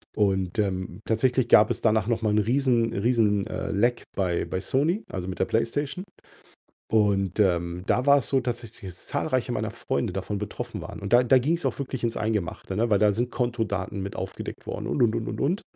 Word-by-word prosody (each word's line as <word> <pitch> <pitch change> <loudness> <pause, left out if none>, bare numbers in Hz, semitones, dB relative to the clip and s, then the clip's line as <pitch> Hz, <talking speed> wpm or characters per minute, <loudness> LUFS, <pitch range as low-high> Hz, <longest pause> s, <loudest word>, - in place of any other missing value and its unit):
Und, 95 -4 +1
ähm, 95 -2 -2
tatsächlich 120 +2 +1
gab 105 0 +7
es - - -2
danach 110 -2 +2
noch 115 -1 0
mal 110 - +2
'n 105 - +2
riesen 120 0 +2
riesen, 105 -2 +2
äh, - - -4
Leck 120 +5 +1
bei 90 -3 0
bei 95 - -3
Sony, 155 - +1
also 95 -2 -4
mit 95 - -5
der - - +3
Playstation. 140 - -1 0.9
Und, 100 -3 +2
ähm, 85 -2 +1
da 125 - +2
war 140 0 +7
es 130 - -4
so 135 - +3
tatsächlich, 120 -4 -5
dass 90 - -10
zahlreiche - - -1
meiner - - -2
Freunde - - -2
davon 95 +2 -3
betroffen 105 0 -5
waren. - - -8
Und 100 +3 -3
da 120 +1 +7
da 130 +2 +5
ging's 165 +7 0
auch - - 0
wirklich 130 -3 -4
ins 115 -1 0
Eingemachte, 105 -3 -2
ne, 115 +3 +1
weil 105 -2 +3
da 105 -1 +4
sind 120 +4 -1
Kontodaten 105 -5 -2
mit 100 +1 -5
aufgedeckt - - -6
worden - - -4
und, - - -1
und, 115 -1 +2
und, 115 -1 -3
und, 110 - -4
und. 175 +9 +1
110 Hz, 210 wpm, -26 LUFS, 100-120 Hz, 0.9 s, gab